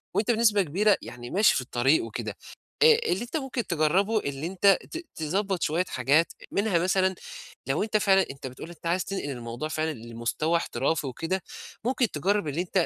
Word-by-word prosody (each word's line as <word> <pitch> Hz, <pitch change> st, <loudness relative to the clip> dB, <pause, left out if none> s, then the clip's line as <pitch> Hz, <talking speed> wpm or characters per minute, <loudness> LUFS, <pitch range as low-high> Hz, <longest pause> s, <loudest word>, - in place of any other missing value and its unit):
وأنت 220 Hz, +3 st, +2 dB
بنسبة 220 Hz, -3 st, +4 dB
كبيرة 195 Hz, +5 st, +2 dB
يعني 120 Hz, 0 st, -9 dB
ماشي 205 Hz, +7 st, +4 dB
في -, -, +1 dB
الطريق 130 Hz, +4 st, +2 dB
وكده. 115 Hz, -1 st, -5 dB, 0.5 s
أ -, -, +7 dB, 0.3 s
اللي 185 Hz, -, 0 dB
أنت 245 Hz, +7 st, -3 dB
ممكن 265 Hz, -4 st, -3 dB
تجرّبه، 180 Hz, +7 st, +2 dB
اللي 140 Hz, -2 st, -4 dB
أنت 195 Hz, +2 st, +4 dB
ت -, -, -4 dB, 0.2 s
تضبّط 190 Hz, +4 st, -1 dB
شوية 170 Hz, +4 st, +1 dB
حاجات. 140 Hz, +7 st, +2 dB, 0.2 s
منها 200 Hz, -4 st, +1 dB
مثلًا 185 Hz, +1 st, +2 dB, 0.5 s
لو 135 Hz, +7 st, +1 dB
أنت 215 Hz, 0 st, +1 dB
فعلًا 195 Hz, -2 st, +4 dB
أنت 135 Hz, -1 st, -8 dB
بتقول 130 Hz, +6 st, -9 dB
أنت 170 Hz, -1 st, -13 dB
عايز 170 Hz, +1 st, 0 dB
تنقل 190 Hz, -7 st, -4 dB
الموضوع 120 Hz, +2 st, -5 dB
فعلًا 155 Hz, 0 st, -1 dB
لمستوى 120 Hz, +7 st, -1 dB
احترافي 160 Hz, -3 st, -1 dB
وكده، 165 Hz, +8 st, -3 dB, 0.4 s
ممكن 250 Hz, -2 st, +1 dB
تجرّب 195 Hz, +4 st, 0 dB
اللي 150 Hz, +4 st, -1 dB
أنت 180 Hz, -1 st, +1 dB
170 Hz, 175 wpm, -27 LUFS, 145-200 Hz, 0.5 s, أ